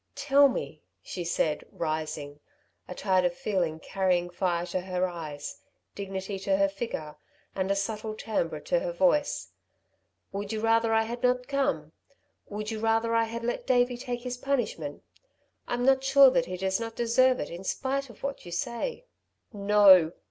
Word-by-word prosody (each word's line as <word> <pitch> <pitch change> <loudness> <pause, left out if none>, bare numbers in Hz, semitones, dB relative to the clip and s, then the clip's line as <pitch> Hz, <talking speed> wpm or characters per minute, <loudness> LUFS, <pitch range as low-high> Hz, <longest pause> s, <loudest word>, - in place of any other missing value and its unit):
"Tell 280 0 +5
me," 150 - -5 0.2
she 180 - -5
said, 155 -2 0
rising, 155 -2 -4 0.5
a 180 - -7
tide 185 -1 +2
of 175 -1 0
feeling 175 -5 -1
carrying 180 -1 0
fire 175 -1 0
to 180 +1 -2
her 185 0 -1
eyes, 155 -5 -7 0.3
dignity 195 0 -5
to 195 0 +1
her 195 0 +4
figure 195 -7 -5 0.4
and 190 0 -2
a 200 - +2
subtle 215 +2 -3
timbre 170 -8 -2
to 175 - +1
her 175 - -3
voice, 190 +12 +1 0.8
"would 200 +1 -4
you 220 - -2
rather 225 +1 +2
I 225 0 +4
had 235 +2 -5
not 250 0 +1
come? 215 - -1 0.6
Would 210 +1 -5
you 220 - -4
rather 225 +1 +1
I 230 0 +3
had 230 +1 -6
let 240 +1 -3
Davey 245 -1 +3
take 245 0 -5
his 250 -1 -4
punishment? 240 - -2 0.6
I'm 245 +1 -1
not 265 0 +4
sure 270 0 +7
that 255 -1 +1
he 185 - -4
does 190 +2 0
not 225 -1 -5
deserve 255 +2 +3
it - - -4
in 175 +2 -7
spite 270 +6 -2
of 235 - -15
what 275 0 -4
you 175 - -10
say." 240 - -3 0.5
"No!" 200 -5 +6
205 Hz, 170 wpm, -28 LUFS, 175-240 Hz, 0.8 s, sure